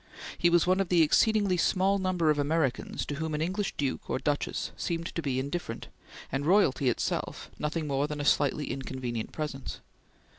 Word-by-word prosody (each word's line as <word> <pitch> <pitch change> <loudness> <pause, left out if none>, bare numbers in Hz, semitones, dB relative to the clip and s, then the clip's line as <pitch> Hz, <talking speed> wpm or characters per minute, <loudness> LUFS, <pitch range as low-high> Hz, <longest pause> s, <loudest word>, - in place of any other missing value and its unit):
He 175 - +3
was 170 -1 +4
one 185 +1 +3
of 195 -2 0
the 175 -2 +5
exceedingly 205 +3 +3
small 190 +3 +2
number 180 -4 +2
of 150 - 0
Americans 145 -3 0
to 145 - -4
whom 160 0 -2
an 150 - -2
English 190 +3 -2
duke 140 -3 -2
or - - +1
duchess 145 +2 -1
seemed 170 -1 -3
to 165 - -2
be 135 -4 -1
indifferent, 140 -3 -4 0.4
and 135 +2 -1
royalty 145 -7 +3
itself 120 - -2
nothing 155 +1 -2
more 140 0 0
than 150 -1 -5
a 145 - -2
slightly 145 +1 +2
inconvenient 130 -4 -4
presence. 150 -4 -5
155 Hz, 180 wpm, -29 LUFS, 140-175 Hz, 0.4 s, the